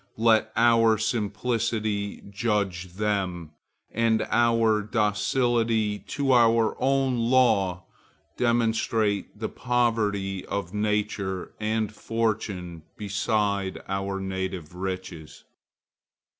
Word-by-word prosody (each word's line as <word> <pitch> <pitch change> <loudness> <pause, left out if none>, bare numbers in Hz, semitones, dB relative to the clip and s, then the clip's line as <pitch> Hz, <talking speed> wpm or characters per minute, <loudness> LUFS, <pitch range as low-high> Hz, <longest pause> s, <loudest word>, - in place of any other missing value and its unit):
Let 110 -1 +3
our 115 -1 +4
simplicity 110 -1 -1
judge 100 -5 -1
them, 95 -5 -2 0.4
and 115 -1 +2
our 115 -2 +3
docility 110 0 +1
to 140 -2 -2
our 115 -2 +4
own 135 -1 +2
law 105 -8 +3 0.5
demonstrate 110 -3 0
the 110 +1 -3
poverty 105 -6 0
of 100 -2 -4
nature 105 -3 -2
and 110 0 -1
fortune 105 -7 -2 0.2
beside 100 -1 -1
our 95 0 -2
native 95 -4 -4
riches. 90 -4 -6
105 Hz, 85 wpm, -26 LUFS, 95-115 Hz, 0.5 s, our